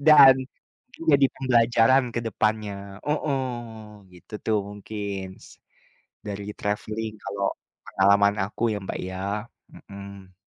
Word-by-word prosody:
Dan. 140 -4 +10 0.8
Jadi 140 -1 +6
pembelajaran 120 0 +4
ke - - +1
depannya. 100 -2 -2
Heeh, 145 -2 0 0.7
gitu 90 +4 -17
tuh 110 -1 +2
mungkin 100 -1 -5 0.2
s - - -15 0.7
dari 100 -1 -5
travelling 110 +1 -3
kalau 100 0 -2 0.4
pengalaman 100 +1 +4
aku 105 +3 -7
ya, - - -2
Mbak, 95 - -5
ya. 95 0 -5 0.5
Mhm. 100 -1 -12
105 Hz, 110 wpm, -25 LUFS, 100-120 Hz, 0.8 s, Dan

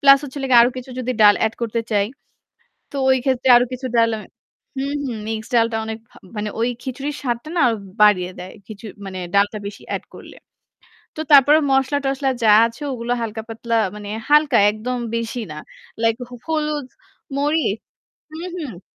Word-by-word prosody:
Plus 275 0 +8
হচ্ছে 285 -1 -9
হলো 270 - -2
গিয়ে 240 -2 +8
আরও 240 - +3
কিছু 255 +1 -7
যদি 255 0 -2
ডাল 205 -1 +8
add 220 - -4
করতে 230 0 -1
চাই 205 -2 +2 0.8
তো - - -7
ওই 260 - +5
ক্ষেত্রে 260 -1 +1
আরও 245 - +5
কিছু 255 +1 -5
ডাল 230 0 +5
আমি 215 - -9 0.5
হুম, 275 +2 -2
হুম। 235 -3 -4
মিক্সড 220 +1 -5
ডালটা 230 0 +2
অনেক 220 0 -5
ভা - - -21 0.2
মানে 210 0 -2
ওই 235 - +2
খিচুড়ির 275 +3 -4
স্বাদটা 240 +1 -3
না - - +3
আরও 230 -2 +1 0.3
বাড়িয়ে 185 -4 +4
দেয়। 180 +1 -8
খিচু 215 +1 -10 0.2
মানে 185 -1 -6 0.2
ডালটা 205 +2 +2
বেশি 200 - -8
add - - -9
করলে। - - -12 0.8
তো 310 - -4
তারপরে 285 +2 +8
মসলা-টসলা 270 0 +1
যা - - +4 0.2
আছে 230 +5 -6
ওগুলো 240 -1 -4
হালকা 220 -1 -4
পাতলা 230 +1 -3 0.2
মানে 205 -1 -8 0.2
হালকা 295 -4 +5
একদম 225 +4 -3 0.2
বেশি 230 +1 -3
না। - - -7 0.5
Like 225 0 +2
হ - - -12
হলুদ, 300 -3 -1 0.5
মরিচ 290 -7 +1 0.5
হুম, 335 +3 -6
হুম। 265 - -6
240 Hz, 180 wpm, -21 LUFS, 220-275 Hz, 0.8 s, Plus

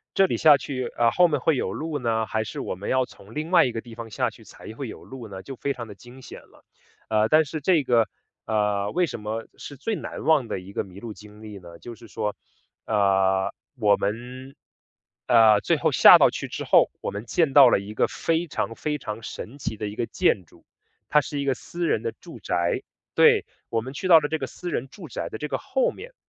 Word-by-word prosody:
这 195 - +5
里 - - -1
下 150 -3 +6
去， 130 -3 -4
呃， 115 -1 +4
后 180 - +5
面 150 -4 -1
会 150 +4 +2
有 - - -2
路 155 -2 -4
呢？ 115 -2 0
还 110 0 -2
是 110 - -7
我 - - -3
们 95 +3 -6
要 130 -1 +2
从 105 -1 -16
另 155 +3 -4
外 185 - +6
一 125 - -1
个 115 -1 -5
地 120 -2 -13
方 115 0 -8
下 - - -1
去 - - -17
才 110 - -12
会 130 +2 -6
有 - - -10
路 130 -4 -9
呢？ 95 -2 -9
就 135 - -8
非 140 +3 -2
常 120 -3 -8
地 105 - -9
惊 120 +6 -15
险 - - -10
了。 - - -23 0.4
呃， 110 0 +2
但 155 0 +5
是 150 +1 -6
这 165 -1 +3
个 120 -3 +3 0.4
呃， 105 -2 0
为 180 0 +2
什 150 - -6
么 110 +2 -4
是 145 - -9
最 220 - -2
难 - - -7
忘 150 -7 +3
的 - - -3
一 95 +2 -12
个 - - -1
迷 95 0 -13
路 115 -1 -7
经 105 +1 -15
历 105 -2 -9
呢？ 85 -2 -13
就 120 - -9
是 115 0 -14
说， 105 -2 -3 0.5
呃， 95 -2 +2 0.2
我 105 -4 +4
们， 125 +7 -5 0.7
呃， 110 -3 +6
最 - - +1
后 - - +1
下 - - +9
到 - - +5
去 - - -5
之 - - -5
后， - - +4
我 - - -3
们 100 +3 -6
见 150 +1 +1
到 135 -3 +9
了 100 - +3
一 100 +2 -8
个 - - +2
非 165 +1 -1
常 115 - -3
非 150 +3 -2
常 110 -3 -6
神 115 +3 -8
奇 110 - -4
的 105 0 -4
一 105 - -7
个 115 - -1
建 95 - +1
筑， - - -23 0.4
它 150 - +5
是 145 -1 -5
一 140 - -2
个 135 - +2
私 170 +6 -5
人 110 - +1
的 115 - -3
住 - - -13
宅。 85 0 -1 0.3
对， - - +5 0.2
我 115 -1 0
们 130 +4 -8
去 185 - -4
到 170 -3 +8
了 145 - -2
这 160 - -1
个 135 - -4
私 175 +6 -7
人 135 -5 -3
住 200 - -11
宅 - - -5
的 - - -6
这 - - -3
个 - - -2
后 - - 0
面， - - -10
120 Hz, 265 characters per minute, -24 LUFS, 105-145 Hz, 0.7 s, 下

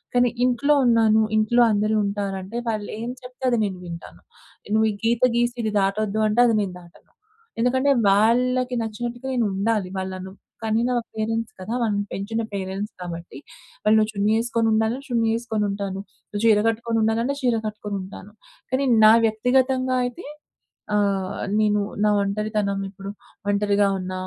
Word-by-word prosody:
కానీ 245 0 +4 0.2
ఇంట్లో 255 +4 +2
ఉన్నాను, 225 -2 +4 0.2
ఇంట్లో 215 +3 +3
అందరూ 215 +1 +1
ఉంటారంటే 200 +1 -4
వాళ్ళు 215 -2 -3
ఏం 235 - -4
చెప్తే 250 +1 -12
అది 240 - +2
నేను 190 -2 -4
వింటాను. 170 -1 -9 0.5
నువ్వు 220 0 +4
ఈ - - -5
గీత 235 +1 +1
గీసి 240 0 +1
ఇది 215 - -1
దాటొద్దు 205 +2 0
అంటే 215 +3 0
అది 230 - +2
నేను 195 -3 -3
దాటను. 175 -1 -19 0.5
ఎందుకంటే 260 +3 +2 0.2
వాళ్ళకి 250 +4 +2
నచ్చినట్టుగా 240 +3 -5
నేనుండాలి. 210 -3 0
వాళ్ళనను 190 0 -5 0.3
కనీనా 225 +3 +1 0.2
పేరెంట్స్ 225 +1 -2
కదా! 185 +5 -5
వాళ్ళని 205 -3 0
పెంచిన 225 +4 -3
పేరెంట్స్ 195 +2 -4
కాబట్టి 170 -3 -7 0.5
వాళ్ళు 215 +1 +4
నువ్వు 215 0 +1
చున్నీ 205 +1 +1
ఎసుకొని 230 -1 0
ఉండాలన్న 220 +4 +1
చున్నీ 230 -3 +1
ఎసుకొని 225 -3 -2
ఉంటాను. 200 -1 -4 0.3
నువ్వు 205 - -4
చీర 215 -2 +5
కట్టుకొని 230 0 -1
ఉండాలన్న 225 +5 +1
చీర 245 -3 +2
కట్టుకొని 210 -1 -5
ఉంటాను. 195 +2 -10 0.4
కానీ 265 +2 +1 0.2
నా 215 - +9
వ్యక్తిగతంగా 255 +3 +1
అయితే 245 +8 -6 0.7
ఆహ్, 200 -2 0 0.2
నేను 210 -1 +2 0.2
నా - - +4
ఒంటరితనం 205 0 -1
ఇప్పుడు 195 0 -8 0.4
ఒంటరిగా 205 0 +2
ఉన్న, 185 0 -5
215 Hz, 150 wpm, -23 LUFS, 200-235 Hz, 0.7 s, నా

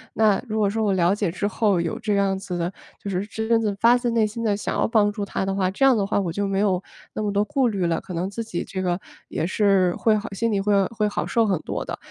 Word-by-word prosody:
那 215 -3 +3
如 215 0 -1
果 205 - +3
说 220 +2 -1
我 205 - +2
了 185 0 +3
解 205 -5 -1
之 200 +3 -2
后 205 -2 +1
有 170 -1 -2
这 210 -2 -1
样 195 -1 +1
子 180 -2 -5
的 175 +2 -2 0.3
就 200 - -5
是 190 +1 -1
真 220 +2 0
正 210 -2 0
发 235 +3 +5
自 240 -1 -1
内 225 -2 +2
心 230 +2 -6
地 210 -3 +1
想 205 - -3
要 - - +2
帮 215 -3 +3
助 205 - -4
他 190 - -2
的 195 0 -1
话， 185 -2 +1
这 270 +8 +2
样 265 - +6
的 205 -3 +1
话 200 - 0
我 190 -3 -1
就 200 +3 -1
没 195 0 -1
有 195 -3 +1 0.3
那 - - -3
么 205 - 0
多 205 +1 +1
顾 265 +1 +1
虑 195 -5 -1
了， 165 -1 0
可 185 - -9
能 175 +3 -2
自 230 +3 -4
己 195 -6 -4
这 190 - -4
个 180 0 0 0.3
也 160 - -2
是 195 -3 +2
会 220 - +2
好 210 +2 -5
心 230 +3 0
里 200 - +1
会 200 -1 +2
会 215 -2 -1
好 205 - -2
受 230 -1 +2
很 195 -4 +1
多 - - -4
的。 - - -5
200 Hz, 310 characters per minute, -23 LUFS, 190-220 Hz, 0.3 s, 样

